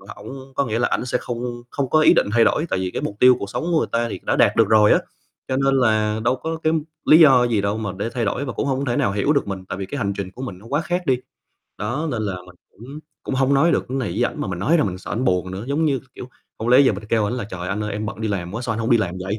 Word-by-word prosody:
ổng 135 0 -10
có 140 - +1
nghĩa 115 0 -2
là, 120 - +2
ảnh - - -2
sẽ 125 - 0
không 120 0 -5
không 135 -1 -3
có 155 - +4
ý - - +6
định - - +2
thay 115 0 +4
đổi, 155 - +2
tại 95 - 0
vì 95 -1 -2
cái - - -4
mục 100 - -4
tiêu 125 0 +7
cuộc 100 - -5
sống - - -3
của 165 - +3
người - - +1
ta 115 0 0
thì - - -5
đã - - 0
đạt - - +3
được - - +4
rồi 105 -1 +5
á, - - +5 0.5
cho 130 - -1
nên 135 0 +2
là 110 -4 +2
đâu 125 - +2
có 160 +4 -4
cái 160 +1 +2 0.3
lý 155 - +7
do 135 -6 +7
gì 110 -4 +1
đâu 100 +2 -1
mà 105 -3 -3
để 110 +3 -2
thay 120 -3 -1
đổi, 130 +7 -2
và 125 - -5
cũng - - -2
hông 135 0 -1
thể 120 -1 -1
nào 100 - +1
hiểu 105 +9 +1
được 140 - 0
mình, 95 -2 -5
tại - - -4
vì 95 - -4
cái 145 - -6
hành 100 -6 -1
trình 95 -1 -4
của 125 - -10
mình 110 -9 -6
nó 105 - -17
quá 145 +3 +1
khác 175 +2 -2
đi. 130 -4 +2 0.6
Đó, 130 +10 -2
nên 115 -4 -2
là 100 -3 -2
mình 90 - -15 0.2
cũng 135 +8 -11 0.2
cũng - - -4
hông 135 +1 +2
nói 160 +5 +4
được - - -1
cái 135 +1 -2
này 125 - -2
với 115 +7 0
ảnh, 150 - -3
mà 100 - -3
mình 90 - -4
nói 155 - +2
ra 150 - +2
mình 90 -1 -3
sợ - - -10
ảnh 125 +5 -1
buồn 90 -4 0
nữa, 95 +3 -6
giống 155 +3 0
như, 140 -4 +1
k - - -15
kiểu, 125 - -9 0.3
hông 115 - -3
lẽ 125 +2 +7
giờ 135 -5 +4
mình 100 +2 -7
kêu 110 -2 +2
ảnh 110 - -1
là 125 - -3
"Trời, 90 -3 -6
anh 100 +2 -2
ơi, 105 - -4
em 105 +1 -3
bận 110 0 -6
đi 110 - -1
làm 90 -3 -3
quá, 120 - -4
sao 120 - -2
anh 110 - -4
hông 115 +1 -2
đi 120 - +6
làm 90 -4 -2
vậy! 100 +3 -3
120 Hz, 335 wpm, -21 LUFS, 100-135 Hz, 0.6 s, tiêu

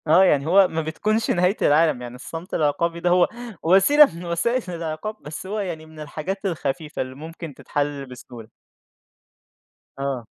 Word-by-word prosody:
آه، 165 +5 +6
يعني 145 -5 +3
هو 190 +3 +6
ما 160 -1 -2
بتكونش 210 +8 0
نهاية 180 +3 +2
العالم 155 -3 +3
يعني 120 0 -7
الصمت 165 +7 -8
العقابي 165 +3 0
ده 175 - +1
هو 180 0 +5 0.4
وسيلة 195 - +7
من 175 +1 -8
وسائل 225 +9 0
العقاب، 165 +4 -4
بس 155 +5 -8
هو 210 +2 -3
يعني 170 -6 -4
من 160 0 -14
الحاجات 155 +6 -5
الخفيفة 155 -3 -3
اللي 130 0 -5
ممكن 160 +1 -8
تتحل 145 +1 -3
بسهولة. 125 -3 -11 1.5
آه. 135 -4 -3
160 Hz, 155 wpm, -23 LUFS, 145-180 Hz, 1.5 s, وسيلة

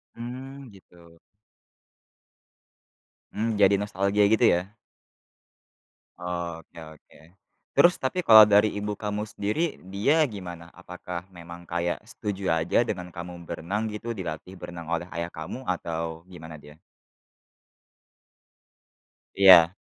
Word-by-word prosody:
Mmm, 130 +3 -8
gitu. 85 -4 -19 2.2
Mmm, 110 -1 -2
jadi 100 0 +5
nostalgia 100 0 0
gitu 110 +2 +4
ya? 90 +3 -2 1.5
Oke 85 -2 -6
oke. 80 -1 -15 0.6
Terus 175 +1 +7
tapi 170 +7 -2
kalau 110 -1 +10
dari 105 +1 +4
ibu 105 0 -4
kamu 105 0 -3
sendiri 125 +13 -2 0.2
dia 145 +11 +3
gimana? 90 - -8
Apakah 90 +1 -8
memang 85 -1 -11
kayak 85 0 -2
setuju 100 -8 -2
aja 80 +8 +2
dengan 90 -7 -4
kamu 85 0 -8
berenang 100 +8 -3
gitu 115 +1 -5
dilatih 90 +1 -6
berenang 85 -2 -9
oleh 85 +1 -1
ayah 85 0 -3
kamu 80 +10 -7
atau 85 -2 -4
gimana 80 -4 -11
dia? 75 +2 -16 2.6
Iya. 95 -3 +8
90 Hz, 110 wpm, -26 LUFS, 85-105 Hz, 2.6 s, kalau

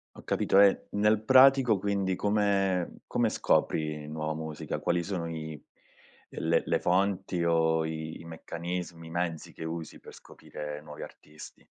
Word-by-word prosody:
Ho - - -11
capito. 95 - +2
E 100 -1 +5
nel 105 +1 +2
pratico 130 -2 +6
quindi 100 -2 -1
come 100 -3 +1
come - - +1
scopri 75 -1 0
nuova 80 0 -3
musica? 80 -1 -5
Quali 85 0 0
sono 85 -3 -3
i 80 -2 -6 0.7
le - - 0
le - - +1
fonti, 95 -1 0
o 80 -1 +2
i 80 +1 -6
meccanismi, 85 0 -6
i - - -10
mezzi 85 -2 -3
che - - -8
usi 80 0 -6
per - - -13
scoprire 75 0 -8
nuovi 75 -1 -9
artisti? 75 0 -13
85 Hz, 145 wpm, -29 LUFS, 80-100 Hz, 0.7 s, pratico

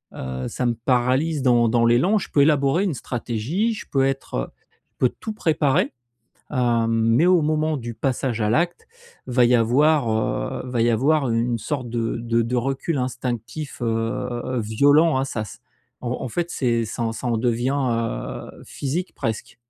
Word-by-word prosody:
heu, 65 -1 -4
ça 125 - -3
me 120 - 0
paralyse 130 +5 +2
dans 120 -2 +4
dans 115 0 +3
l'élan. 130 - +4
Je - - -7
peux 145 - +4
élaborer 145 +3 +3
une 185 - 0
stratégie, 125 - -2
je 210 - -8
peux 135 -1 +3
être, 135 0 -3
heu, - - -2 0.4
je - - -50
peux 125 - +4
tout 220 - -7
préparer, 155 -8 +1 0.6
hem, 120 -4 +1
mais 115 +6 +3
au 180 -2 +5
moment 155 0 0
du 120 -2 -6
passage 125 -1 -1
à 105 - +1
l'acte, 170 +8 0 0.4
va 125 -1 +3
y 125 +1 +4
avoir, 130 +3 +3
heu, 110 0 -1
va 120 -2 0
y 120 - +3
avoir 135 +4 +2
une 115 +1 +1
une - - 0
sorte 125 +1 -3
de 115 -1 -2
de 115 0 +1
de 125 +2 -2
recul 135 +5 -1
instinctif, 125 +2 -4
heu, 120 +2 -2
violent, 145 +8 +4
hein, 135 - 0
ça 110 -5 -3
c'est - - -12 0.4
en 120 - -3
en - - -3
fait, 175 +7 -2
c'est 120 -5 0
ça 115 +1 -3
ça 120 +2 -5
en 115 -2 +1
devient, 120 +3 0
heu, 115 - -2
physique 160 +7 -4
presque. 110 +1 -4
125 Hz, 180 wpm, -23 LUFS, 115-145 Hz, 0.6 s, au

